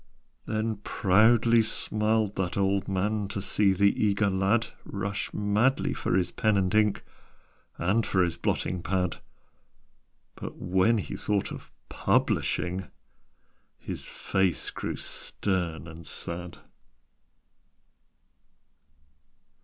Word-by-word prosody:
Then 110 0 -1
proudly 110 +4 +4
smiled 110 -1 +1
that 95 -1 -2
old 100 0 +1
man 100 +2 0
To 100 - -4
see 100 0 +2
the 100 +3 +2
eager 100 -1 +2
lad 100 +5 +2 0.2
Rush 100 0 -4
madly 105 +6 +1
for - - -1
his 90 -2 +1
pen 110 -2 +2
and 95 -1 +1
ink 105 -1 +2 0.7
And 100 +7 +2
for 95 -3 +2
his 85 -2 -1
blotting 90 +1 -1
pad 90 +1 -1 1.2
But, - - -7
when 95 +6 +2
he 105 - -4
thought 105 -2 -1
of - - -9 0.2
publishing, 90 0 0 0.9
His - - -6
face 95 -2 -1
grew - - -4
stern 85 -5 -3
and 80 0 -10
sad. 85 +1 -5
100 Hz, 105 wpm, -28 LUFS, 90-105 Hz, 1.2 s, proudly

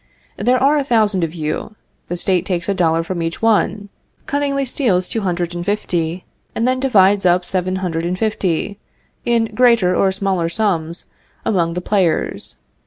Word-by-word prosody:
There 250 +1 +2
are 280 +3 +3
a - - 0
thousand 215 -8 +2
of 165 +1 -3
you; 155 +6 -4 0.3
the 175 - -3
State 180 0 +1
takes 180 -2 -3
a 200 - +1
dollar 165 -3 +1
from 175 0 -4
each 165 0 -3
one, 210 -2 +1 0.4
cunningly 280 -1 -1
steals 210 -9 +1
two 225 - -2
hundred 175 -2 -2
and 175 0 -4
fifty, 180 -3 -2 0.3
and 230 - 0
then 255 0 +1
divides 205 -6 +4
up 180 0 +3
seven 185 0 -1
hundred 165 -2 -2
and 180 +1 -2
fifty, 200 -2 -1 0.5
in 230 -2 +1
greater 225 -6 +4
or 195 - +3
smaller 190 -3 -1
sums, 170 -4 -1 0.4
among 170 -5 +1
the 180 - -2
players. 180 - 0
190 Hz, 170 wpm, -18 LUFS, 175-220 Hz, 0.5 s, divides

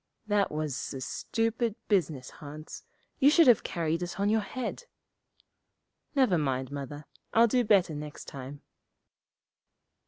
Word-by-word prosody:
'That 205 -2 +1
was 150 -3 -3
a - - -4
stupid 225 - -1
business, 155 - 0
Hans. 150 +1 -8 0.4
You 280 0 +7
should 330 +2 +6
have 245 -5 +6
carried 165 -1 -1
it 175 +2 -5
on 200 +1 +2
your 220 +1 +3
head.' 255 - -5 1.3
'Never 245 - +4
mind, 130 -2 -1
Mother; 145 +1 -6 0.3
I'll 230 +1 +7
do 245 +2 +2
better 195 -7 +4
next 150 0 -7
time.' 140 0 -8
175 Hz, 130 wpm, -29 LUFS, 145-225 Hz, 1.3 s, You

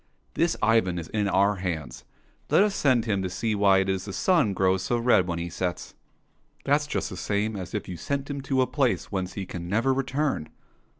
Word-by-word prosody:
'* - - -41
This 170 0 +1
Ivan 105 -5 +3
is 80 -2 -6
in 105 -2 0
our 100 +1 +2
hands; 80 -8 -5 0.4
let - - +5
us 210 -1 +1
send 130 - +2
him 100 -4 0
to 95 - -2
see 110 +5 -2
why 100 -2 +4
it 95 - -2
is 95 -1 -1
the 100 - -6
sun 140 - +2
grows 95 0 +2
so 120 +5 0
red 115 -6 +3
when 85 -1 -2
he 85 0 -3
sets." 90 +1 -4 0.2
— - - -43
" - - -36
That's 145 +2 +2
just - - -2
the - - -5
same 105 +3 -1
as 95 -1 -6
if 105 - -3
you 90 - -6
sent 140 - -3
him 145 -1 -4
to 135 -1 +1
a - - +1
place 130 0 0
whence 95 -2 -3
he 100 - -5
can 85 -1 -7
never 115 +7 +2
return." 135 - -1
100 Hz, 235 wpm, -26 LUFS, 95-130 Hz, 0.4 s, let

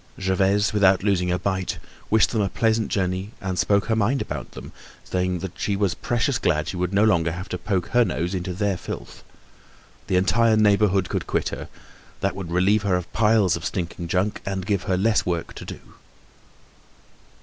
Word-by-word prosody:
Gervaise, 95 +3 +2
without 95 -3 +4
losing 90 -3 +1
a 90 - +1
bite, 95 +1 -2 0.3
wished 110 0 +4
them 110 - +1
a 100 - 0
pleasant 110 0 +1
journey, 95 +2 -2
and 95 -1 -3
spoke 100 -1 +2
her 110 - +1
mind 110 +6 +1
about 75 - -5
them, - - -9 0.3
saying 90 0 -1
that 95 - -4
she 100 - 0
was 100 -3 +1
precious 120 - -1
glad 75 -3 +1
she - - -4
would 90 0 -1
no 100 +1 +3
longer 85 -7 +3
have 90 +4 -6
to 90 - -3
poke 95 -3 -1
her 120 0 +4
nose 90 -3 -2
into 90 0 -3
their 100 -1 0
filth. - - -8 0.8
The 95 - 0
entire 110 +4 +3
neighborhood 100 -3 +3
could - - -3
quit - - 0
her; - - -7 0.5
that - - 0
would 95 -3 -6
relieve 95 +5 +3
her 100 -3 +1
of 90 - -1
the - - -24
piles 110 -3 +3
of 85 - -7
stinking 85 -1 -4
junk 95 +5 0
and 95 -2 -3
give 100 -3 -1
her 90 - +2
less 105 +3 +2
work 85 -2 -3
to - - -9
do. - - -8
95 Hz, 195 wpm, -23 LUFS, 90-105 Hz, 0.8 s, without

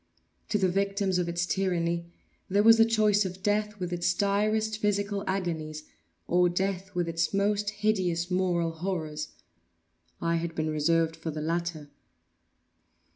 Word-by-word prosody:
To 210 - +2
the 190 -2 +2
victims 195 0 0
of 175 -1 -1
its 175 0 -1
tyranny, 170 -3 -1 0.4
there 200 +2 +3
was 225 +1 +7
the 225 - +8
choice 215 -2 +3
of 185 0 -6
death 210 0 0
with 180 -1 -3
its 175 0 +1
direst 215 +2 +1
physical 205 -1 0
agonies, 160 -5 -3 0.4
or 180 0 +3
death 190 +2 -2
with 175 -1 0
its 165 +3 -1
most 205 +1 +1
hideous 190 -5 0
moral 175 -2 +1
horrors. 160 -3 -3 0.9
I 170 0 +1
had 165 0 -4
been 155 0 -1
reserved 160 +2 +1
for 165 0 -6
the 155 0 -4
latter. 165 -2 -3
180 Hz, 145 wpm, -28 LUFS, 170-205 Hz, 0.9 s, the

